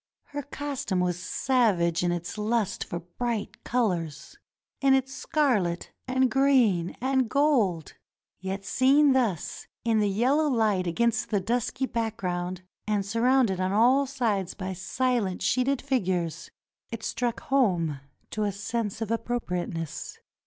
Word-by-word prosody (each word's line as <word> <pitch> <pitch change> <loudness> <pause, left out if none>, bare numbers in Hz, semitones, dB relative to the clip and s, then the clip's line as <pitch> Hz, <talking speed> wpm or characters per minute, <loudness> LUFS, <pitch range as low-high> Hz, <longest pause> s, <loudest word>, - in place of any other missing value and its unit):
Her 290 0 -4
costume 275 -8 -3
was 175 -1 0
savage 185 -5 +1
in 175 - +2
its 175 0 -4
lust 215 -1 0
for 170 - -5
bright 215 +5 -4
colors 180 - -1 0.2
— - - -59
in 270 -1 +5
its 265 0 -1
scarlet, 240 - 0 0.2
and 260 0 +2
green, 245 -11 +3
and 260 -2 +1
gold; 235 - +2 0.5
yet 190 +1 -4
seen 275 +2 +4
thus 225 - -1 0.2
in 225 -2 +3
the 205 -1 +2
yellow 265 +10 +2
light 215 -7 +1
against 235 +6 +1
the 205 - +1
dusky 240 +5 -1
background 185 -7 -3 0.2
and 205 -2 0
surrounded 230 -2 +2
on 185 +1 0
all 255 +6 +4
sides 225 -9 -1
by 190 -2 -4
silent 235 -1 -1
sheeted 255 +2 +1
figures, 185 - -1 0.4
it 230 -1 -6
struck 240 -2 -1
home 180 - +1 0.3
to 215 - -3
a 205 - +1
sense 210 +1 -3
of 225 -1 -2
appropriateness. 180 -9 -3
225 Hz, 135 wpm, -27 LUFS, 185-255 Hz, 0.5 s, in